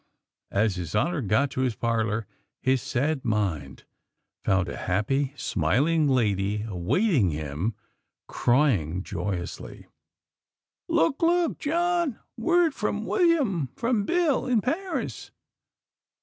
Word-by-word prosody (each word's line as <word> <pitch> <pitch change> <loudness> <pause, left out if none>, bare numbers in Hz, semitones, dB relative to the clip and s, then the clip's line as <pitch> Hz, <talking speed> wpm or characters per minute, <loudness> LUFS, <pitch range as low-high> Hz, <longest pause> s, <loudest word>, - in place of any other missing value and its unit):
_ - - -44 0.5
As 100 -1 +1
His 90 +2 -4
Honor 155 +8 +1
got 110 +6 +1
to 130 - -2
his 125 -4 0
parlor, 115 -2 -1 0.3
his 130 -1 +1
sad 140 +2 -1
mind 95 - -2 0.6
found 95 -1 +2
a - - -5
happy, 130 +9 0
smiling 140 - +1
Lady 105 -5 +1
awaiting 110 - +1
him; 75 +7 -3 0.5
crying 105 - +1
joyously: 90 -4 -5 1.0
"Look! 165 - +2
Look, 340 0 +2
John! 340 -3 0 0.2
Word 335 +6 +2
from - - -2
William! 275 - +2
From 230 -3 0
Bill, 335 -7 +1
in 240 -4 +2
Paris!" 350 - -3
130 Hz, 110 wpm, -26 LUFS, -, 1.0 s, found